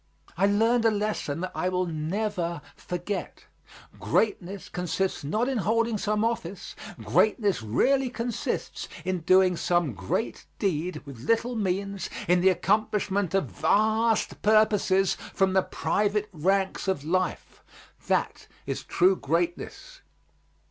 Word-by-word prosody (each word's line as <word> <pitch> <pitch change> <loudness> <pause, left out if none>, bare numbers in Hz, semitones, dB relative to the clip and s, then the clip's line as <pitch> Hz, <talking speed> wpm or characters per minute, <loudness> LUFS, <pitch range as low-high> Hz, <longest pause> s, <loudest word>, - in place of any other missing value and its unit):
I 190 +4 +3
learned 225 +4 +3
a - - +7
lesson 205 -8 -2
that 185 - -3
I 185 - -1
will 185 0 0
never 170 0 -2
forget. 180 +3 -5 0.5
Greatness 200 -3 -1
consists 180 0 -2
not 215 - 0
in 265 -4 0
holding 225 +1 +1
some 210 +1 0
office; 200 -5 -4 0.2
greatness 210 - +2
really 255 - +2
consists 235 -1 -3 0.2
in 185 -1 -1
doing 185 +2 +4
some 175 -5 +1
great 95 -2 -3
deed 180 -1 -2
with 140 -4 -10
little 230 +2 +1
means, 200 -1 -2 0.2
in 180 +1 +4
the 190 - +6
accomplishment 200 0 0
of 195 - +2
vast 220 +1 +1
purposes 205 -3 +3 0.2
from 190 -1 +2
the 190 - +4
private 210 +2 -1
ranks 190 +5 0
of 190 -7 0
life; 185 +3 -2 0.5
that - - 0 0.2
is - - -3
true 185 +1 +3
greatness. 175 - -3
195 Hz, 125 wpm, -27 LUFS, 180-215 Hz, 0.5 s, a